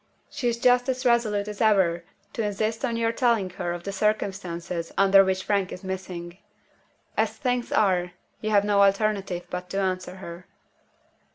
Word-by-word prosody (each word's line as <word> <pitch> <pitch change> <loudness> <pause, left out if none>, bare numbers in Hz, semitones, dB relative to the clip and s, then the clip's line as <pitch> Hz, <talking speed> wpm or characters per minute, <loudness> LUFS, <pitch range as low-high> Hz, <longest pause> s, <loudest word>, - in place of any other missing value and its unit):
She 280 -4 -2
is 235 -1 0
just 245 +1 +3
as 255 0 -2
resolute 220 -4 +2
as 210 +1 -6
ever 190 -6 +3 0.3
to - - -2
insist 215 +2 -2
on 235 -4 0
your 230 0 +1
telling 230 -6 +1
her 180 -2 -4
of 175 0 -5
the 200 - -4
circumstances 185 -5 -2
under 195 0 +6
which 190 0 -1
Frank 200 -3 0
is 180 - -8
missing. 185 -2 -6 0.8
As - - 0
things 250 -3 -1
are, 180 -4 +2 0.3
you 215 - -2
have 205 -1 +3
no 205 -1 +3
alternative 195 -3 +1
but 180 0 -5
to 195 - -2
answer 185 -1 -2
her." 175 -1 -10
200 Hz, 170 wpm, -25 LUFS, 185-220 Hz, 0.8 s, under